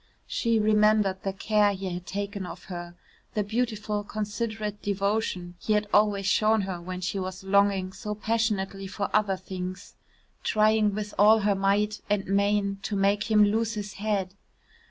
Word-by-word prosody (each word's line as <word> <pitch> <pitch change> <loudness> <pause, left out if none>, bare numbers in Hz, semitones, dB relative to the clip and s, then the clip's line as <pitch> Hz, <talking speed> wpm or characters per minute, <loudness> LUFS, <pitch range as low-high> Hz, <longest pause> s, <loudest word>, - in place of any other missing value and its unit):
She 230 -2 0
remembered 210 -2 +3
the 195 - -2
care 205 +1 +2
he 190 +1 -6
had 180 0 -6
taken 200 0 -4
of - - -9
her, 175 -2 -7 0.4
the 210 - +1
beautiful 215 -1 -2
considerate 210 0 -4
devotion 200 -3 -1
he 215 - 0
had 210 0 +2
always 205 -1 +3
shown 215 +2 +3
her 185 -3 -4
when 180 +1 -6
she 185 +2 -2
was 185 0 -5
longing 195 -1 +2
so 210 +2 -5
passionately 210 -3 -1
for 200 +1 -3
other 205 -3 +2
things, 185 0 -7 0.5
trying 215 -1 +3
with 210 0 -4
all 215 +2 +6
her 205 0 +3
might 200 +2 +1
and 205 -1 +1
main 200 0 +1
to 205 - -3
make 200 +3 +1
him 210 -1 +6
lose 225 +2 0
his 205 -1 -5
head. 200 -3 -1
205 Hz, 160 wpm, -27 LUFS, 195-215 Hz, 0.5 s, all